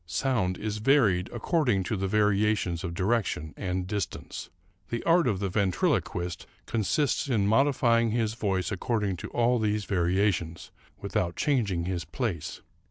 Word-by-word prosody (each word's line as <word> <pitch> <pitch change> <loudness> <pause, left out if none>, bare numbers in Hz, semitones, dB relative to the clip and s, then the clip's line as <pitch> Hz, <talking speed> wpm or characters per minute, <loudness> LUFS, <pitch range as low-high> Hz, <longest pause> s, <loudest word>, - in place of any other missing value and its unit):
Sound 105 -4 0
is 105 0 -3
varied 105 -7 +3
according 120 - +1
to 100 - -2
the 95 -1 -1
variations 105 -3 +1
of 85 -2 -4
direction 95 -6 -1
and 90 -1 -2
distance. 100 +1 -4 0.4
The 120 - -3
art 170 -1 +4
of 105 -5 +1
the 100 +1 -2
ventriloquist 90 -2 -1 0.2
consists 130 +6 0
in 110 -6 +2
modifying 115 0 +3
his 110 -1 0
voice 100 -3 -1
according 105 -2 -1
to - - -7
all 120 +1 +2
these 105 -1 0
variations, 90 -2 0 0.3
without 85 -1 -2
changing 105 - 0
his 90 -2 -2
place. 85 - -4
105 Hz, 140 wpm, -28 LUFS, 90-115 Hz, 0.4 s, art